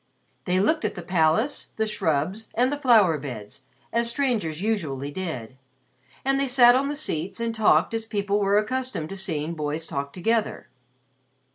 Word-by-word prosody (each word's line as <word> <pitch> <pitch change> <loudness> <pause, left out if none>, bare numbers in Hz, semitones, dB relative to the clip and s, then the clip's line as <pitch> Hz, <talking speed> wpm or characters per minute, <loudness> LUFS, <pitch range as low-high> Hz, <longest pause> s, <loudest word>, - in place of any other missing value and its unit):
They 180 0 +1
looked 310 - +2
at - - -2
the 175 - -7
palace, 180 - +1
the 220 - 0
shrubs, 185 +1 -1
and 250 +3 +2
the 290 - -3
flower 215 - +4
beds, 125 -4 -8 0.3
as 235 0 +2
strangers 235 - -1
usually 155 -10 -2
did, 145 -9 -5 0.7
and 270 0 +2
they 275 - +1
sat 245 -1 +7
on 265 +2 +1
the 295 - -2
seats 190 - -3
and 230 0 -1
talked 220 0 +3
as 225 0 -2
people 205 -2 -1
were 200 0 +3
accustomed 255 -6 -2
to 195 - -6
seeing 165 -5 -2
boys 155 0 -3
talk 140 -2 -4
together. 220 - -1
200 Hz, 165 wpm, -25 LUFS, 160-235 Hz, 0.7 s, sat